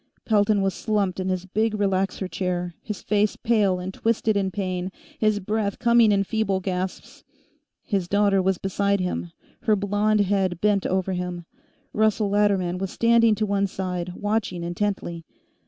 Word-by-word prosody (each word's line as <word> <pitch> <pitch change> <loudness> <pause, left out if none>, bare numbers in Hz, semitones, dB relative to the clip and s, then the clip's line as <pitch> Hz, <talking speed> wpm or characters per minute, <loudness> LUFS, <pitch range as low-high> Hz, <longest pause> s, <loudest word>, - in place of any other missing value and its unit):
Pelton 205 -2 +3
was 195 -1 +1
slumped 200 -2 -1
in 185 0 -2
his 185 0 -2
big 215 +4 0
relaxer 195 -1 0
chair, 180 -1 -2
his 210 -2 -6
face 210 0 +1
pale 210 -5 +2
and 185 +1 -5
twisted 225 0 0
in 195 -1 +1
pain, 185 -1 -3 0.3
his 215 -1 +2
breath 205 0 -2
coming 235 -2 +4
in 200 -1 +3
feeble 200 -2 0
gasps. 185 0 -4 0.6
His 195 -5 -1
daughter 200 0 +3
was 190 0 +1
beside 200 +2 0
him, 180 -1 -3 0.3
her 215 - +4
blond 205 +1 +1
head 190 -3 0
bent 205 -1 +2
over 190 0 0
him; 180 -1 -4 0.5
Russell 215 -1 +2
Latterman 195 -3 +1
was 195 0 -2
standing 230 0 +4
to 215 +1 0
one 200 -1 +1
side, 180 -2 -4
watching 205 -4 -2
intently. 175 -1 -3
195 Hz, 155 wpm, -24 LUFS, 185-210 Hz, 0.6 s, coming